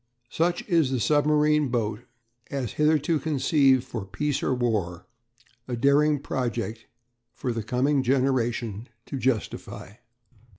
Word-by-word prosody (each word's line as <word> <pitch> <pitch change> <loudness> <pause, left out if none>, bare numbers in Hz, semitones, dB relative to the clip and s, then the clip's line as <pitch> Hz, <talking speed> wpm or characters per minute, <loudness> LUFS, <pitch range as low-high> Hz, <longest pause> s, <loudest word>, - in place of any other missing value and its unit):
Such 175 +2 0
is 165 -8 +3
the 130 -1 -1
submarine 150 +2 +3
boat 110 -4 -1 0.5
as 130 -6 -3
hitherto 150 +1 +2
conceived 135 -3 +2
for 120 -5 -6
peace 115 +10 -2
or - - 0
war 105 -8 -1 0.6
a 125 - -2
daring 145 +4 +3
project 120 -4 -4 0.5
for 125 - -3
the 115 - -3
coming 130 +6 +1
generation 120 -4 0 0.2
to 135 - -5
justify. 120 -5 -3
130 Hz, 120 wpm, -26 LUFS, 115-150 Hz, 0.6 s, is